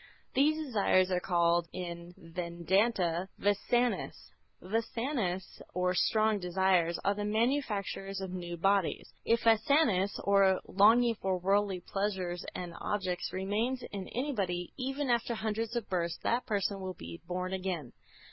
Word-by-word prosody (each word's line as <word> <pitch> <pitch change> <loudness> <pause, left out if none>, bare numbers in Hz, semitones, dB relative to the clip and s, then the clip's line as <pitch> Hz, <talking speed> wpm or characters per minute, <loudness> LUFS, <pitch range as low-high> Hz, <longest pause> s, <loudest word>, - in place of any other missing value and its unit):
These 300 +3 +3
desires 205 -10 +2
are 180 - +2
called 170 -1 +2
in 175 -1 -7
Vedanta, 175 +2 0
Vâsanâs. 240 +4 0 0.3
Vâsanâs 225 -2 -2
or 180 0 +1
strong 215 +3 +2
desires 180 -2 +2
are 200 - +3
the 205 +1 -4
manufacturers 210 -4 -1
of 190 -1 -5
new 175 -2 -5
bodies. 195 +1 +1
If 230 +1 +3
Vâsanâ 225 -3 +4 0.2
or 195 -1 +4
longing 230 +4 +5
for 190 -1 0
worldly 195 0 +1
pleasures 185 -2 -2
and 175 -2 -5
objects 185 -4 -2
remains 215 +7 -1
in 195 -2 -5
anybody, 200 -10 -2
even 270 +2 -2
after 235 -1 +1
hundreds 225 +1 -2
of 235 -3 -2
births, 170 -3 -1
that 240 +2 0
person 200 -1 -1
will 185 -1 -5
be 85 - -9
born 180 +1 -3
again. 180 -8 -3
195 Hz, 130 wpm, -31 LUFS, 180-225 Hz, 0.3 s, longing